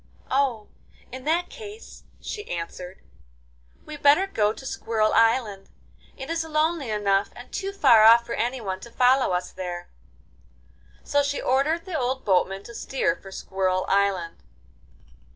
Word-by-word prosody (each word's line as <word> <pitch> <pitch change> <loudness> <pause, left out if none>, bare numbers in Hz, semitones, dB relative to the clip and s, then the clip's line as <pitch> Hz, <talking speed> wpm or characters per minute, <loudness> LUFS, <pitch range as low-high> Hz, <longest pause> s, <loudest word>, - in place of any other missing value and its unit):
'Oh, 260 -5 +1 0.5
in 260 +1 -8
that 335 +3 0
case,' 430 -1 -11
she 420 - -7
answered, 180 +2 -6 0.8
'we 305 - -9
had 295 - -9
better 290 +7 +5
go 210 - +1
to 270 - -10
Squirrel 220 -4 0
Island; 225 -4 +2 0.5
it 265 - -7
is 330 0 -1
lonely 310 -3 0
enough, 200 -2 +1
and 245 - -12
too 390 0 -3
far 265 - +5
off 230 +2 +7
for 235 - -5
anyone 230 -7 -2
to 235 - -11
follow 255 +1 +3
us 180 0 -2
there.' 175 -2 -6 1.1
So 285 - +2
she 285 0 -2
ordered 300 +7 +1
the 350 -5 -3
old 260 +1 -2
boatman 195 0 +1
to 235 - -11
steer 245 -7 -1
for 195 - -13
Squirrel 185 -1 -1
Island. 195 -4 0
235 Hz, 150 wpm, -25 LUFS, 195-285 Hz, 1.1 s, off